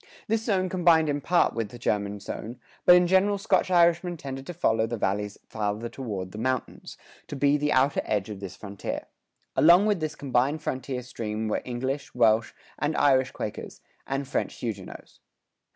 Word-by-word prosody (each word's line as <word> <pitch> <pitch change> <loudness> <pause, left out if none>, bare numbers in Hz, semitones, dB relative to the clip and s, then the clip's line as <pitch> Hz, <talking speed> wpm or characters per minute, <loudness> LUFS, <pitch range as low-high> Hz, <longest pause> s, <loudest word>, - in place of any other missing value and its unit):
This 225 +1 0
zone 190 -4 +1
combined 170 -4 +3
in 145 0 -1
part 175 +4 +2
with 115 -3 -3
the 120 - -10
German 105 -3 -1
zone, 115 +4 -7 0.3
but 180 - +9
in 180 0 +5
general 190 +3 +3
Scotch 195 -2 +1
Irishmen 175 0 +3
tended 135 -2 -7
to 175 - -5
follow 110 -9 +1
the 120 +1 -3
valleys 105 0 -1
farther 110 +1 -3
toward 105 -7 -5
the 105 - -8
mountains, 130 +1 -3 0.3
to - - -6
be 140 +1 +3
the 150 0 0
outer 135 +2 +3
edge 100 -2 -1
of 105 -3 -7
this 95 -2 -7
frontier. 100 -2 -6 0.5
Along 175 +5 +6
with 210 -4 +2
this 155 -1 -3
combined 140 +3 0
frontier 130 -1 -3
stream 110 -3 -4
were 105 - -1
English, 130 +3 -4
Welsh 115 -2 +3 0.3
and 150 +3 -1
Irish 130 -2 +4
Quakers, 105 - -6 0.3
and 135 0 -2
French 140 - -2
Huguenots. 105 -6 -7
130 Hz, 175 wpm, -26 LUFS, 110-160 Hz, 0.5 s, but